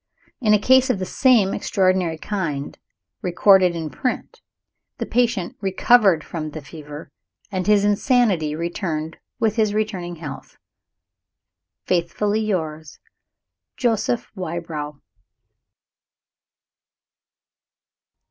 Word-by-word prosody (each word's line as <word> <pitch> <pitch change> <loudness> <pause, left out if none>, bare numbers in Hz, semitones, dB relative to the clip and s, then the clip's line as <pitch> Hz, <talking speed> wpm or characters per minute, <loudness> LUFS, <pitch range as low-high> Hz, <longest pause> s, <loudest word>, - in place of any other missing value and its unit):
In 215 -4 +3
a - - +5
case 260 +5 +4
of 250 - +2
the 185 - -3
same 225 -2 +3
extraordinary 185 -4 +1
kind, 160 -7 -3 0.5
recorded 185 0 +4
in 160 -2 -4
print, 250 - -4 0.6
the - - -3
patient 230 -7 0
recovered 195 -3 +4
from 155 -2 -5
the 155 +1 -8
fever, 150 0 -10 0.4
and 185 -1 -2
his 205 -1 +4
insanity 205 - +2
returned 165 -1 -3 0.2
with 220 0 +1
his 215 -2 +2
returning 190 -5 -2
health. 150 -4 -9 1.3
Faithfully 195 +4 0
yours, 160 -7 -3 0.8
JOSEPH 235 -1 0
WYBROW. 160 -5 -5
185 Hz, 95 wpm, -22 LUFS, 160-210 Hz, 1.3 s, a